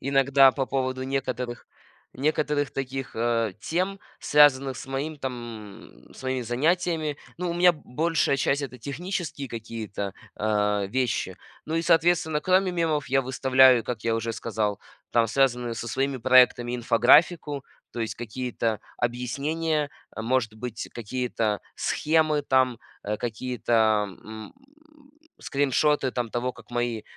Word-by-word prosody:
Иногда 135 0 +5
по 135 - -1
поводу 130 -1 -2
некоторых, 130 -2 -3 0.5
некоторых 150 0 0
таких, 135 -1 -5
а, 115 -2 +1
тем, 185 +8 -1 0.2
связанных 140 -3 +4
с - - -8
моим, 140 +4 -3
там, 120 -6 -7 0.2
с - - -12
моими 130 -1 -1
занятиями. 155 +4 0 0.2
Ну, 180 -1 -2
у 170 - -2
меня 175 0 +5
большая 155 0 0
часть- 140 +1 +1
это 130 -2 -6
технические 155 -2 -4
какие-то, 110 -4 -5 0.2
а, 105 -1 +1
вещи. 115 -5 -1 0.3
Ну 160 - -3
и, 165 - +1
соответственно, 165 -2 +3
кроме 185 0 +3
мемов 160 -5 -1
я 135 +1 +3
выставляю, 130 -1 +5
как 110 -1 -5
я 115 -1 +1
уже 115 0 -2
сказал, 105 -3 -2 0.3
там 115 -1 +3
связанную 125 -1 +1
со 115 - -5
своими 135 +3 -1
проектами 125 0 +4
инфографику, 135 +5 +3 0.3
то 120 - -5
есть 115 - -2
какие-то 120 -1 -3 0.2
объяснения, 145 +6 -1 0.3
э, 110 - -3
может 115 -2 0
быть, 115 0 -6
какие-то 115 -2 -2 0.2
схемы 155 -1 +1
там, 130 -3 +2 0.2
а, 105 +1 -2
какие-то 115 -2 +1
м, 110 0 -10 0.9
скриншоты, 145 0 +1
там, 120 -2 -2
того, 125 +1 -2
как - - -17
мои 120 -2 -2
130 Hz, 135 wpm, -26 LUFS, 115-145 Hz, 0.9 s, Иногда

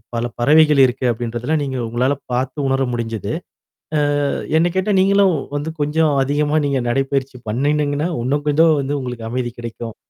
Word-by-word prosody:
பல 115 - -1 0.2
பறவைகள் 150 +1 +5
இருக்கு 125 +1 -2
அப்படின்றதெல்லாம் 120 +6 -2
நீங்க 130 -2 -3
உங்களால 125 +5 0 0.2
பார்த்து 130 +3 -2
உணர 135 0 +1
முடிஞ்சது. 115 -3 -3 0.9
அ - - 0 0.3
என்ன 175 +2 +2
கேட்டா 195 +2 +1
நீங்களும் 195 -1 +4 0.2
வந்து 150 +3 -3
கொஞ்சம் 150 +1 +2
அதிகமா 145 +2 +1
நீங்க 135 -2 0
நடைப்பயிற்சி 135 0 -1
பண்ணணீங்கன்னா, 145 +5 0
உன்னும் 145 +4 -1
கொஞ்சம் 155 +1 +4
வந்து 140 +2 -2
உங்களுக்கு 125 -3 -6
அமைதி 120 -1 -2
கிடைக்கும். 115 -1 -7
140 Hz, 150 wpm, -19 LUFS, 125-150 Hz, 0.9 s, பறவைகள்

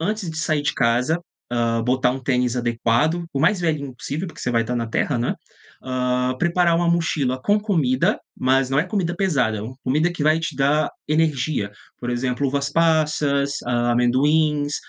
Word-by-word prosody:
Antes 205 0 -2
de 160 - -6
sair 155 -3 0
de - - 0
casa, 125 +7 +1 0.3
hã, 115 -1 0
botar 125 +1 +2
um 135 - -5
tênis 125 -1 +1
adequado. 120 +7 +1
O 135 - -1
mais 180 +5 +3
velhinho 150 -5 -1
possível, 150 +8 -4
porque - - -12
você 125 - -2
vai 115 -1 +3
tá 125 +2 -2
na 115 -1 -2
terra, 120 +3 -1
não 120 - 0
é. - - -2 0.5
Hã. 125 0 0
Preparar 170 +1 +2
uma 170 0 +1
mochila 150 -6 0
com 205 +6 +3
comida, 155 - +1 0.2
mas 130 0 +2
não 135 - +2
é 150 - +2
comida 185 -2 -1
pesada, 135 - +1
é 100 - -5
uma 125 +4 -7
comida 155 +7 +1
que 175 - -4
vai 155 +2 +3
te 165 -2 -4
dar 145 +3 +2 0.2
energia, 150 -8 0 0.3
por 120 - -6
exemplo, 125 +3 -1
uvas 140 +1 -1
passas, 150 -3 +1
a 120 0 +1
amendoins, 145 +5 +2
140 Hz, 190 wpm, -22 LUFS, 125-160 Hz, 0.5 s, mais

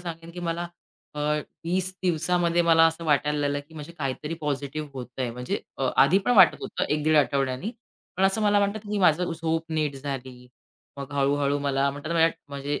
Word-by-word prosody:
सांगेन 165 -1 -7
की 175 - -7
मला 170 +1 -3 0.5
अ, 150 - -7 0.5
20 185 +2 0
दिवसामध्ये 175 0 +2
मला 165 -1 +5
असं 165 +1 -3
वाटायला 150 0 +2
लागलं 145 0 0
की 160 - -17
म्हणजे 155 +2 -8
काहीतरी 150 +3 -3
पॉझिटिव्ह 145 0 -3
होतंय. 125 -1 -4
म्हणजे 125 +1 -4 0.2
अ, 135 - +1
आधी 160 +8 +6
पण 245 - +4
वाटत 185 -4 +7
होतं - - -3
1 150 - 0
दीड 155 0 +4
आठवड्यांनी. 140 - +1 0.5
पण 190 - +2
असं 195 +3 +2
मला 205 0 +4
वाटतं 200 +1 0
की 210 - 0
माझी 180 -1 +4
झोप 160 0 -1
नीट 150 -3 -1
झाली. 130 -2 -7 0.5
मग 140 +1 -7
हळू-हळू 140 0 +1
मला 140 -1 +1
म्हणतात 145 +2 -7
ना - - -2
मला 165 - +6 0.2
म्हणजे 140 +1 -3
150 Hz, 185 wpm, -26 LUFS, 140-170 Hz, 0.5 s, वाटत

